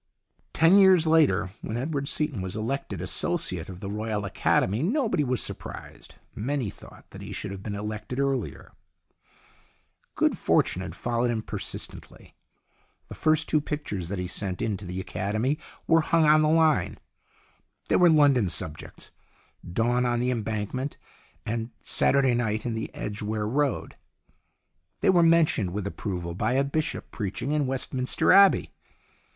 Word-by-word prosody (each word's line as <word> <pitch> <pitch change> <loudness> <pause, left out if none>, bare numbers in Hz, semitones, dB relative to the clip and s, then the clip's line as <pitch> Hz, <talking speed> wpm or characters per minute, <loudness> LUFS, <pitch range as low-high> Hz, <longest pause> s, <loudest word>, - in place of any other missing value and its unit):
Ten 165 +5 +5
years 190 -4 +6
later, 155 - +3
when 110 - -4
Edward 140 +2 -2
Seaton 150 -10 -1
was 95 +1 -4
elected 115 +6 -3
Associate - - -2
of 90 0 -9
the 100 - -5
Royal 105 -1 -3
Academy, 100 +2 +1
nobody 210 - +1
was 125 -4 0
surprised. - - -7 0.2
Many 125 -1 -2
thought - - -15
that - - -10
he - - -8
should 105 - -5
have 100 -1 -7
been 100 0 -5
elected 105 +5 -5
earlier. 135 -4 -2 1.4
Good - - +2
fortune - - +1
had - - -6
followed 120 0 -1
him 110 -2 -2
persistently. - - -6 0.8
The - - -7
first 155 +1 +2
two 155 - +2
pictures 105 - -4
that 100 - -3
he 90 - -3
sent 95 0 -2
to 100 -2 -3
the 90 +1 -5
Academy 110 - -2 0.3
were 165 0 +4
hung 165 0 +2
on 155 +1 +6
the 155 - +3
line. 160 -1 +2 0.9
They - - +3
were 175 -1 +6
London 140 - +4
sub 75 -2 -3
jects - - -11 0.3
" 85 - -15
Dawn 120 +4 +1
on 120 -1 +1
the 125 +1 +1
Embankment 115 +4 -3 0.3
" - - -30 0.2
and 115 +1 -3
" - - -39
Satur 140 0 +3
day 130 -2 +3
Night 110 -2 -1
in 120 - -1
the 110 - -4
Edgware 105 0 -3
Road." 140 +3 -1 1.1
They - - +5
were 175 -2 +4
mentioned 165 - +3
with 100 -1 -3
approval 90 -4 -4
by 110 +7 -1
a 135 +1 +3
bishop 150 +3 -3
preaching 105 +6 -3
in 150 -2 +1
Westminster 130 -1 0
Abbey. 195 0 +6
120 Hz, 160 wpm, -26 LUFS, 105-150 Hz, 1.4 s, years